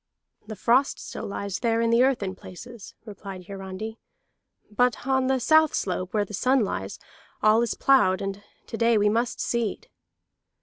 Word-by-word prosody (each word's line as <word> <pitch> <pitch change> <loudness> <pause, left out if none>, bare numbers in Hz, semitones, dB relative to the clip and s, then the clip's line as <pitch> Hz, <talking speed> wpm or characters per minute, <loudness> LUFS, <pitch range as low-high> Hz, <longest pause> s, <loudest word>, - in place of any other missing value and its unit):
"The 215 - -6
frost 245 +7 +2
still - - -7
lies 200 -1 -4
there 230 -1 +1
in 230 0 +1
the 235 +1 +4
earth 260 -4 +2
in 190 -1 -3
places," 210 +4 -11
replied 195 -3 -9
Hiarandi. 195 +3 -7 0.7
"But 245 +3 +1
on 265 -1 +1
the 265 0 +1
south 315 +4 +4
slope, 185 -1 -2
where 210 -2 0
the 210 - -12
sun 255 +6 +2
lies, 210 - -3 0.5
all 215 +2 +5
is 235 - -1
ploughed 190 -9 +3
and 195 0 -5 0.2
to 225 - -6
day 230 -1 +3
we 210 0 +3
must 230 +3 -1
seed." 235 -4 -2
225 Hz, 170 wpm, -25 LUFS, 195-245 Hz, 0.7 s, all